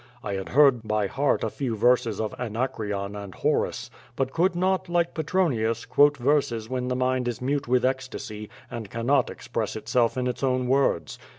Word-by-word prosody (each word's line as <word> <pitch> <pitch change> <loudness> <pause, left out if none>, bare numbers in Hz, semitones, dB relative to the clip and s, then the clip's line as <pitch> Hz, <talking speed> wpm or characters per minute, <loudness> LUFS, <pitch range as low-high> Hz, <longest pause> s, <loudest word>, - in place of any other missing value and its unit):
I 100 - -3
had 95 +4 -5
learned 140 -5 +6
by 105 -1 +1
heart 140 +8 0
a - - 0
few 125 -5 -3
verses 115 -1 +2
of 110 -2 -2
Anacreon 105 -4 -3
and 100 -2 -8
Horace, - - -1 0.2
but 135 0 -1
could 175 +2 +2
not, 185 +1 0
like 170 -1 +1
Petronius, 140 -10 0
quote 145 0 +4
verses 120 -4 +1
when 125 0 -2
the 125 - -1
mind 130 0 0
is 120 -3 -3
mute 140 +2 -1
with 125 0 +2
ecstasy 130 -5 -3 0.2
and 110 -4 -6
cannot 120 +5 +1
express - - -4
itself 120 0 +1
in 125 - 0
its 125 - -3
own 130 -2 +1
words. 135 +2 +1
125 Hz, 180 wpm, -26 LUFS, 110-140 Hz, 0.2 s, learned